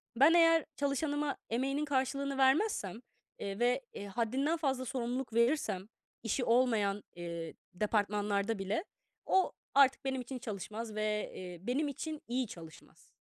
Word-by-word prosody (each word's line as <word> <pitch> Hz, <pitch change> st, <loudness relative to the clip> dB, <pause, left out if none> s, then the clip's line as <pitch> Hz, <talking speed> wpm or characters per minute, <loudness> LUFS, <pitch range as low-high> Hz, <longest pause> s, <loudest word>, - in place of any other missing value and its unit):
Ben 280 Hz, +7 st, +7 dB
eğer 330 Hz, -1 st, +6 dB
çalışanıma 285 Hz, 0 st, 0 dB
emeğinin 275 Hz, +5 st, 0 dB
karşılığını 275 Hz, 0 st, 0 dB
vermezsem, 265 Hz, -, +2 dB, 0.4 s
eee, 195 Hz, +2 st, -4 dB
ve 245 Hz, +2 st, +3 dB, 0.3 s
haddinden 260 Hz, -, 0 dB
fazla 265 Hz, -5 st, 0 dB
sorumluluk 245 Hz, 0 st, -3 dB
verirsem 235 Hz, -5 st, +2 dB, 0.4 s
işi 230 Hz, +3 st, 0 dB
olmayan, 225 Hz, -5 st, +2 dB
eee, 170 Hz, -1 st, -5 dB, 0.2 s
departmanlarda 205 Hz, +1 st, 0 dB
bile, 200 Hz, -, -1 dB, 0.4 s
o 380 Hz, -1 st, +3 dB, 0.2 s
artık 275 Hz, -1 st, +5 dB
benim 265 Hz, -1 st, -1 dB
için 255 Hz, +1 st, -6 dB
çalışmaz 215 Hz, +1 st, -5 dB
ve, 215 Hz, 0 st, -1 dB
eee, 180 Hz, -1 st, -7 dB
benim 285 Hz, +5 st, +1 dB
için 305 Hz, +2 st, -5 dB
iyi 250 Hz, 0 st, 0 dB
çalışmaz 165 Hz, -4 st, -13 dB
245 Hz, 125 wpm, -33 LUFS, 210-275 Hz, 0.4 s, Ben